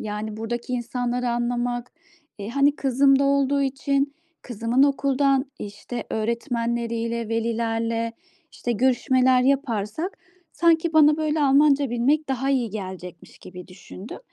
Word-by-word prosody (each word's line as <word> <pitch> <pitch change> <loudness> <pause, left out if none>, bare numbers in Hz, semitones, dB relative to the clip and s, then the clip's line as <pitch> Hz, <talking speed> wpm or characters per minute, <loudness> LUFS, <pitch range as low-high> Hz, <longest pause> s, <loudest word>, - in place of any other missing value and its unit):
yani 210 0 -5
buradaki 235 +3 -4
insanları 245 0 -2
anlamak, 240 0 -2 0.5
eee, 200 0 -6
hani 280 +3 +2
kızım 275 0 +3
da - - +3
olduğu 280 0 +2
için, 275 +1 -1 0.3
kızımın 235 +2 0
okuldan, 275 -1 +2
işte, 210 +4 -7
öğretmenleriyle, 235 0 -2
velilerle, 230 0 -1 0.4
işte, 240 - -3
görüşmeler 255 +1 +3
yaparsak 265 - -1 0.3
sanki 335 -1 +2
bana 305 -1 +5
böyle 310 -1 0
Almanca 280 -1 +4
bilmek 280 +6 +1
daha 265 +1 -1
iyi 250 -5 0
gelecekmiş." 185 -4 -8
gibi 180 -1 -11
düşündüm. 190 +3 -10
245 Hz, 115 wpm, -23 LUFS, 230-275 Hz, 0.5 s, bana